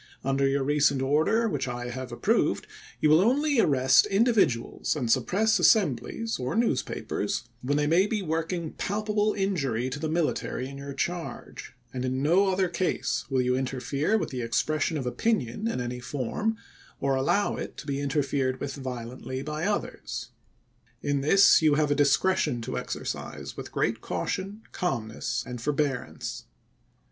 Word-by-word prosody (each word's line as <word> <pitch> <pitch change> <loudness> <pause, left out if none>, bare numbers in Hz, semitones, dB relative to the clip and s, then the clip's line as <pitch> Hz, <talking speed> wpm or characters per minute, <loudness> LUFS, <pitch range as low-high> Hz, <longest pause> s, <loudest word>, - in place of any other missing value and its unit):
Under 135 +1 +2
your 135 0 +1
recent 145 -1 +3
order, 155 - +2
which 145 -10 -2
I 120 0 -4
have 130 0 -6
approved, 120 - +1 0.3
you - - +3
will 155 +3 +7
only 280 +5 +2
arrest 135 - +5
individuals, 200 - +2
and 125 -6 -1
suppress 195 - +2
assemblies, 220 - +2
or 125 0 -2
news 225 - +2
papers, 100 - -3 0.2
when 145 +3 0
they 150 - +2
may 170 +6 +4
be 210 -2 -1
working 165 0 -2
palpable 210 +1 0
injury 140 - 0
to 145 - -4
the 155 0 -2
military 155 -5 -1
in 140 0 -9
your 140 0 -7
charge; 170 -2 -5 0.2
and 125 -1 -3
in 130 +1 -1
no 180 +7 +4
other 185 0 +2
case 175 +1 -1
will 130 -2 +2
you 125 0 +1
interfere 135 - 0
with - - -2
the 130 -2 -3
expression 150 +8 0
of 135 - -3
opinion 175 - 0
in 230 - -1
any 125 0 -3
form, 145 - -2 0.4
or 140 0 +1
allow 135 +10 +1
it - - -6
to - - -8
be 140 -1 -2
interfered 135 -2 0
with 140 - -4
violently 130 0 -5
by 150 +3 -3
others. 205 0 -3 0.7
In 145 -1 0
this 195 +8 +6
you 155 -2 +4
have 150 -1 +2
a - - +6
discretion 145 -1 +2
to - - -4
exercise - - -5
with - - -7
great - - 0
caution, 200 +3 -3
calm 130 - -2
ness, 110 - -3
and 125 -1 -6
forbearance. 145 -1 -2
145 Hz, 160 wpm, -27 LUFS, 130-190 Hz, 0.7 s, will